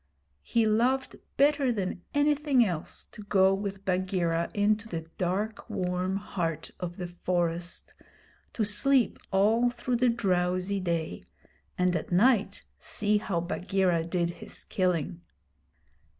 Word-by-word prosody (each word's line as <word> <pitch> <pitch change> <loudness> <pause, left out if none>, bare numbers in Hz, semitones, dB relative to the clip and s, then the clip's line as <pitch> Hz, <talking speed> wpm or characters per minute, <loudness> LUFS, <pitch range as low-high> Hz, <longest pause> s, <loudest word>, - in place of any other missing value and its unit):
He 230 -1 +1
loved 245 +5 +1 0.2
better 280 -2 +4
than 190 -5 -3
anything 290 -3 +3
else 175 -6 -4
to 215 - -10
go 195 -2 +4
with 195 0 -4
Bagheera 180 -3 0
into 210 +1 +1
the 165 -6 -4 0.2
dark 205 +6 -2
warm 185 -2 -1
heart 170 -5 -3
of 175 -1 -5
the 180 - -4
forest, 175 -1 -2 0.6
to 225 - 0
sleep 230 +4 +2
all 220 +5 +3
through 240 0 -2
the 250 +1 +3
drowsy 185 -3 0
day, 170 - -2 0.5
and 180 0 +2
at 160 - -3
night 205 +1 +3 0.2
see 210 0 +1
how 180 -5 -1
Bagheera 180 -1 0
did 170 0 -1
his - - -8
killing. 170 - -1
195 Hz, 125 wpm, -28 LUFS, 175-220 Hz, 0.6 s, better